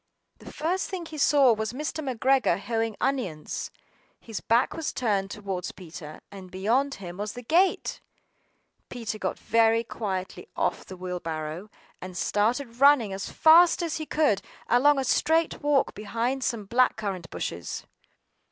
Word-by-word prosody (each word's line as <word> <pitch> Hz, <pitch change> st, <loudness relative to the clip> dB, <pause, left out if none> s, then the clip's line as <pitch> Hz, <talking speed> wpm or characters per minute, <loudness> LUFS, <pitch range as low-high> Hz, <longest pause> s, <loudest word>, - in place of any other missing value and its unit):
The -, -, -11 dB
first 345 Hz, +5 st, -1 dB
thing 370 Hz, -3 st, -5 dB
he 315 Hz, -2 st, -8 dB
saw 275 Hz, -3 st, +5 dB
was 220 Hz, +1 st, -3 dB
Mr. 305 Hz, +3 st, -4 dB
McGregor 260 Hz, -6 st, +2 dB
hoeing 225 Hz, 0 st, -2 dB
onions. 215 Hz, -, -2 dB, 0.5 s
His 225 Hz, -3 st, -6 dB
back 235 Hz, +2 st, +2 dB
was 325 Hz, -2 st, -3 dB
turned 200 Hz, -5 st, 0 dB
towards 195 Hz, -3 st, -4 dB
Peter, 160 Hz, -4 st, -10 dB
and 190 Hz, -2 st, -10 dB
beyond 235 Hz, +10 st, 0 dB
him 180 Hz, -2 st, -8 dB
was 205 Hz, +1 st, -4 dB
the 245 Hz, -, -8 dB
gate! 350 Hz, +10 st, +1 dB, 0.9 s
PETER 225 Hz, -3 st, -5 dB
got -, -, -2 dB
down -, -, -24 dB
very 230 Hz, 0 st, +4 dB
quietly 195 Hz, -, -5 dB
off -, -, -1 dB
the 185 Hz, -, -9 dB
wheelbarrow, 175 Hz, 0 st, -5 dB, 0.3 s
and 185 Hz, -1 st, -7 dB
started 230 Hz, +5 st, 0 dB
running 275 Hz, -8 st, +6 dB
as 195 Hz, +1 st, -5 dB
fast 340 Hz, +2 st, +6 dB
as 335 Hz, -1 st, -2 dB
he 310 Hz, -1 st, -5 dB
could 290 Hz, -11 st, +2 dB
go, 230 Hz, -, -4 dB
along 290 Hz, +3 st, +5 dB
a 270 Hz, -, +1 dB
straight 320 Hz, +5 st, +1 dB
walk 290 Hz, -2 st, +2 dB
behind 235 Hz, +5 st, -2 dB
some 230 Hz, -5 st, -2 dB
black 245 Hz, +5 st, +3 dB
currant 195 Hz, -6 st, -4 dB
bushes. 85 Hz, 0 st, -5 dB
230 Hz, 155 wpm, -27 LUFS, 195-280 Hz, 0.9 s, running